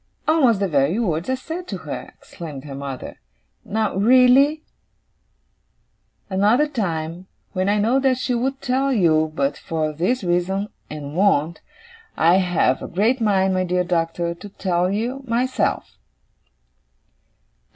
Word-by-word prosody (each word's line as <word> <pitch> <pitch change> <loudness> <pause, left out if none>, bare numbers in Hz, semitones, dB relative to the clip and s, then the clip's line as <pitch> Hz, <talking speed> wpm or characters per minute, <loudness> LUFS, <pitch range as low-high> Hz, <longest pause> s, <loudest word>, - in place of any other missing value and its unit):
'Almost 270 -10 +4
the 200 - +1
very 145 +3 +1
words 175 -5 -1
I 260 - +2
said 330 +7 -7
to - - -4
her!' - - -7
exclaimed 150 -6 -9
her 145 -2 -8
mother. 135 -1 -7 0.4
'Now 215 -2 -1
really, 255 +8 +5 1.6
another 210 +9 +3
time, 175 - -3 0.3
when 185 +1 0
I 205 - +2
know 230 +6 +2
what 265 -2 +2
she 255 0 -1
would 265 +3 -2
tell 270 +1 +1
you 160 -8 +2
but 140 -1 0
for 155 -2 -2
this 195 +11 -1
reason, 185 +3 0 0.2
and 150 -1 -7
won't, 170 -4 +2 0.6
I 170 +3 +5
have 180 -8 +1
a - - -5
great 225 +8 +1
mind, 190 -3 +2
my 185 0 +1
dear 180 0 0
Doctor, 170 -1 -1
to 180 +4 -11
tell 180 -2 -1
you 235 +7 -2
myself. 250 +3 -1
190 Hz, 140 wpm, -21 LUFS, 165-245 Hz, 1.6 s, really